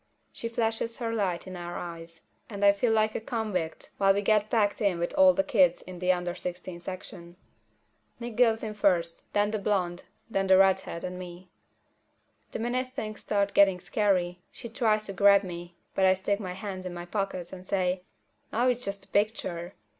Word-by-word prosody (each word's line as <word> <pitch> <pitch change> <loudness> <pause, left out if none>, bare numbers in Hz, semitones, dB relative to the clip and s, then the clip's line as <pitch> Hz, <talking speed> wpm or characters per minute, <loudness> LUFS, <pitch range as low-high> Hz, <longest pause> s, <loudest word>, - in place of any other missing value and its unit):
She 230 - -5
flashes 230 0 -1
her 230 -2 -2
light 190 -6 -1
in 185 -1 -8
our 175 0 -6
eyes, 165 -1 -8 0.3
and 205 -2 -1
I 200 - +9
feel 210 +4 +1
like 215 0 +2
a - - -3
convict 215 -9 -3
while 195 0 +5
we 205 - 0
get 215 0 +3
packed 210 -3 +1
in 200 -4 +2
with 170 +7 -2
all 285 -1 +7
the 290 - +2
kids 190 - +3
in 180 -1 -9
the 180 +1 +3
under 175 -1 -1
sixteen 180 0 -6
section. 175 -1 -8 0.8
Nick 240 -2 -6
goes 225 -2 +3
in 215 -1 -3
first, 175 -5 0
then 205 0 +2
the 215 - -1
blonde, 185 -3 -1 0.2
then 195 -4 -1
the 190 0 +7
redhead 190 -3 +2
and 180 0 -5
me. 180 0 -10 1.0
The - - -3
minute 255 +2 -2
things 215 -5 -5
start 200 -1 0
getting 195 -2 +5
scary, 180 -3 0
she 235 - -8
tries 220 -3 +1
to 195 - -5
grab 200 +1 +6
me, 175 -1 -7 0.2
but 190 - +1
I 190 0 +5
stick 200 +2 -1
my 185 -4 -5
hands 190 -1 -6
in 175 - -6
my 175 0 -6
pockets 190 -2 -3
and 185 -1 -8
say, 185 -2 0 0.5
"Aw, 245 +3 +2
it's 245 0 -1
just 200 -2 -4
a - - -30
picture." 190 -4 -1
195 Hz, 195 wpm, -28 LUFS, 180-215 Hz, 1.0 s, I